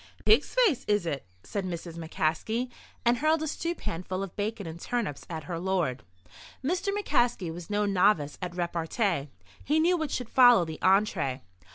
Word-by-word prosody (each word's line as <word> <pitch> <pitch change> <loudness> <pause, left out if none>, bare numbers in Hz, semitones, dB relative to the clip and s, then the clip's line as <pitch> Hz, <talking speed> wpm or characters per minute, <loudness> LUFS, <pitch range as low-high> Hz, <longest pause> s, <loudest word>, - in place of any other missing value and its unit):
"Pig's - - +4
face, 315 - +1
is 205 -3 +2
it?" 140 - -3 0.2
said 200 - -3
Mrs. 170 -2 -5
McCaskey, 170 +9 -1 0.3
and 235 0 +3
hurled 310 +1 +2
a - - -2
stewpan 310 - -3
full 185 +1 -3
of 195 - -8
bacon 210 0 -3
and 165 +1 -7
turnips 230 - -3
at 160 -2 -5
her 170 -2 -4
lord. 175 -8 0 0.6
Mr. 360 +6 0
McCaskey 240 - +1
was 175 0 -9
no 205 0 +1
novice 185 -6 +2
at 180 -1 -4
repartee. 170 - -1 0.3
He 300 +3 +2
knew 345 +3 +4
what 315 -3 -2
should 250 -3 -4
follow 245 -8 +7
the 160 -1 -7
entrée. 190 - +2
195 Hz, 170 wpm, -28 LUFS, 165-245 Hz, 0.6 s, follow